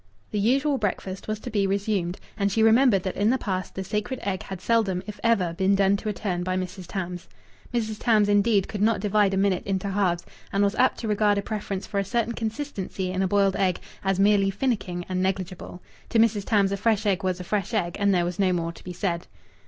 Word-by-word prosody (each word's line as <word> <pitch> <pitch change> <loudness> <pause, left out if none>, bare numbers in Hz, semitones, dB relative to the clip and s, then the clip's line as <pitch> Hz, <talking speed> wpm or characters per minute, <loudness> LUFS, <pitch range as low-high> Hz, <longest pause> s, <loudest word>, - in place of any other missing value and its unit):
The 210 - -1
usual 270 +6 +2
breakfast 190 -2 -3
was 215 0 -2
to 245 - -6
be 200 -2 +1
resumed; 195 -2 -1 0.2
and 200 -2 0
she 220 +3 +2
remembered 225 -3 +5
that 185 - -3
in 205 +2 +2
the 260 - +3
past 185 -6 -3
the 190 - -3
sacred 210 +6 -3
egg 195 -2 -2
had 190 -2 -7
seldom, 195 -3 +1
if 210 -1 -8
ever, 200 -8 +2
been 190 +3 +2
done 195 0 +3
to 215 - -4
a - - -1
turn 185 -3 -2
by 185 +1 -1
Mrs. 185 0 -5
Tams. 180 -2 -5 0.4
Mrs. 220 -3 -2
Tams, 215 -4 +3
indeed, 205 -1 +3
could 205 - -5
not 220 -1 +3
divide 205 0 +2
a 195 - 0
minute 195 -2 +2
into 195 0 -2
halves, 185 -3 0 0.3
and 200 +1 +2
was 200 0 +2
apt 255 +3 +2
to 225 - -3
regard 210 -1 +2
a 200 - -1
preference 205 -3 -4
for 200 - -2
a - - +1
certain 235 +3 -1
consistency 220 -5 -4
in 185 +1 -1
a 190 - +2
boiled 195 0 +2
egg 185 -2 +1 0.2
as 195 -1 +1
merely 200 -1 +4
finicking 195 -5 -2
and 185 -1 -1
negligible. 185 -1 -3 0.3
To 230 - +1
Mrs. 220 -3 +3
Tams 200 -3 +2
a 200 - -1
fresh 215 0 +1
egg 195 -1 +1
was 185 -1 -1
a - - -5
fresh 200 +2 -2
egg, 180 -7 -1
and 200 0 +3
there 175 -2 +2
was 175 +1 -4
no 190 -2 +3
more 170 -2 -1
to - - -15
be 180 - -6
said. 175 -2 -2
200 Hz, 235 wpm, -25 LUFS, 185-215 Hz, 0.4 s, remembered